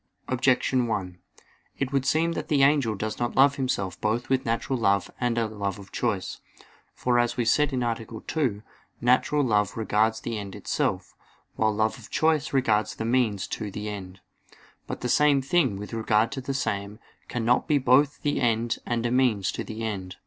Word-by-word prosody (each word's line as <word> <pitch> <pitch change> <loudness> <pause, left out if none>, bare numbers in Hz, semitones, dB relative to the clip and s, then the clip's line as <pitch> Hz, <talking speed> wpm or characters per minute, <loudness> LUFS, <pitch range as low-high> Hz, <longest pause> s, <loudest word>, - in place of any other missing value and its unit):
Objection 130 -1 +2
1: 90 -5 -3 0.6
It 135 -2 -2
would 135 -1 +1
seem 165 +4 +2
that - - -4
the 140 -3 +3
angel 135 -6 +3
does 110 +2 -4
not 120 0 -2
love 140 +2 +5
himself 100 -9 -2
both 110 +3 -1
with 130 +1 +1
natural 115 +3 -1
love 100 -3 +1
and 120 -1 0
a 115 - +2
love 100 -3 -3
of 100 -1 -13
choice. 105 -6 -2 0.5
For, 125 -1 +1
as 120 0 0
was 120 -1 +2
said 150 +1 +2
(A. 120 -3 -2 0.2
2), 125 -10 -1 0.4
natural 130 +4 +2
love 105 -5 +1
regards 110 0 +1
the 115 -2 -3
end 100 -2 -7
itself; - - -2 0.4
while 110 0 +2
love 110 +2 0
of 110 - -13
choice 155 -2 +1
regards 110 -6 +1
the 110 - -4
means 115 -5 +1
to 105 -2 -4
the 105 +2 -5
end. 95 -2 -8 0.7
But - - -5
the 125 - -1
same 145 +3 +4
thing, 135 - +1
with 105 +3 -8
regard 110 0 +2
to 135 - -4
the 135 +1 -4
same, 100 -5 -2 0.3
cannot 120 +1 +1
be 150 -2 +3
both 140 +2 +3
the 145 -2 0
end 115 -1 +1
and 120 -1 -1
a 120 - 0
means 115 -7 +2
to - - -4
the 110 +1 -6
end. 95 -4 -4
115 Hz, 185 wpm, -26 LUFS, 105-130 Hz, 0.7 s, love